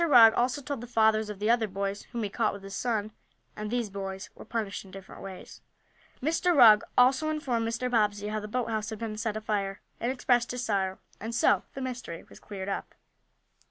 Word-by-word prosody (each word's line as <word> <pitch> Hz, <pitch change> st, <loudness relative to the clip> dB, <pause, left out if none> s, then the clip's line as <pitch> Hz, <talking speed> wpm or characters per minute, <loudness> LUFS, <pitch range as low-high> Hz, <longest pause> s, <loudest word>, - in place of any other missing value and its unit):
Rugg 240 Hz, -8 st, +8 dB
also 255 Hz, +4 st, 0 dB
told 275 Hz, -2 st, -4 dB
the 240 Hz, -, -7 dB
fathers 220 Hz, -2 st, +3 dB
of 210 Hz, -, -5 dB
the 210 Hz, +3 st, +2 dB
other 235 Hz, -2 st, +2 dB
boys 195 Hz, +1 st, -4 dB
whom 235 Hz, -2 st, -3 dB
he 205 Hz, -, -2 dB
caught 220 Hz, -1 st, +1 dB
with 200 Hz, -1 st, -9 dB
his 195 Hz, 0 st, -7 dB
son, 220 Hz, -3 st, -1 dB, 0.4 s
and 210 Hz, 0 st, -4 dB
these 235 Hz, -3 st, -1 dB
boys 195 Hz, +1 st, -6 dB
were -, -, -11 dB
punished 220 Hz, -4 st, -3 dB
in 195 Hz, -, -15 dB
different 190 Hz, 0 st, -11 dB
ways. 190 Hz, -2 st, -9 dB, 0.6 s
Mr. 330 Hz, +3 st, +2 dB
Rugg 215 Hz, -5 st, +9 dB, 0.2 s
also 260 Hz, +5 st, +5 dB
informed 255 Hz, -7 st, -1 dB
Mr. 230 Hz, +2 st, -1 dB
Bobbsey 210 Hz, -3 st, +1 dB
how 215 Hz, 0 st, -1 dB
the 210 Hz, -, -6 dB
boathouse 225 Hz, -2 st, -2 dB
had 220 Hz, -, -5 dB
been 220 Hz, -1 st, -4 dB
set 220 Hz, -1 st, -1 dB
afire, 205 Hz, -2 st, -2 dB, 0.2 s
and 240 Hz, -, 0 dB
expressed 245 Hz, -2 st, +2 dB
his 250 Hz, 0 st, -3 dB
sorrow. 190 Hz, -3 st, 0 dB, 0.2 s
And 225 Hz, +2 st, -4 dB
so 205 Hz, -5 st, +3 dB
the 270 Hz, -, -5 dB
mystery 240 Hz, -9 st, -5 dB
was -, -, -15 dB
cleared 195 Hz, -2 st, -7 dB
up. 200 Hz, -, -4 dB
220 Hz, 205 wpm, -29 LUFS, 205-245 Hz, 0.6 s, Rugg